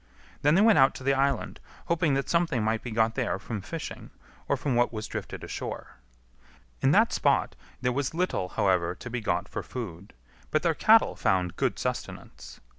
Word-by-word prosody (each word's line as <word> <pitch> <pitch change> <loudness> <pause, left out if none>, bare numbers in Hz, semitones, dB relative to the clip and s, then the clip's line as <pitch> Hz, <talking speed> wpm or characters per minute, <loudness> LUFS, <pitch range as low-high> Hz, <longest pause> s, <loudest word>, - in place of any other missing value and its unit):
Then 150 +3 +4
they 190 - +5
went 220 -7 +6
out 135 0 +5
to - - -8
the 135 +1 +3
island, 135 -2 0 0.3
hoping 165 -4 +1
that 135 - -1
something 170 -9 +1
might 110 +1 0
be 125 - -6
got 110 0 +1
there 125 -1 -1
from 110 -4 -5
fishing 160 - -7 0.4
or - - +2
from 140 - -1
what 120 0 +2
was 110 -2 -5
drifted - - -6
ashore. - - -6 0.8
In - - +4
that - - +4
spot - - +1 0.3
there 125 0 +1
was 140 +3 -2
little, 175 - -1
however, 90 -3 +1
to 125 - -9
be 125 -1 -3
got 100 -2 -1
for - - -5
food, 100 -6 -8 0.4
but 155 - +1
their 170 -2 +3
cattle 220 +7 +5
found 90 -2 0
good - - 0
sustenance. - - -6
125 Hz, 190 wpm, -27 LUFS, 105-150 Hz, 0.8 s, went